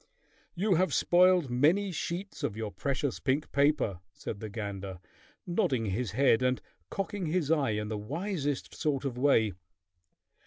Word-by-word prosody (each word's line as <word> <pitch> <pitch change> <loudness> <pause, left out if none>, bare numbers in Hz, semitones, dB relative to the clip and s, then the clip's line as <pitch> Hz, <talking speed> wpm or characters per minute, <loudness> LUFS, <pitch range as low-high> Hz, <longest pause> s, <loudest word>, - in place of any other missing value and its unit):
"You 195 +3 +2
have 185 +2 +2
spoiled 180 -5 +4
many 165 +11 +3
sheets 180 +3 -4
of 105 - -2
your 110 -2 -3
precious 140 +1 -2
pink 140 +3 0
paper," 140 - +2
said 100 - -6
the 110 - -6
gander, 100 -3 -5 0.5
nodding 170 - +1
his 105 +3 -2
head 130 -1 +4
and 125 0 +2 0.3
cocking 195 -1 -3
his 160 -2 0
eye 140 -8 +2
in 105 0 -2
the 105 -1 -3
wisest 145 - -3
sort 145 -4 -1
of 130 -3 -2
way. 125 -6 +3
140 Hz, 150 wpm, -30 LUFS, 110-175 Hz, 0.5 s, spoiled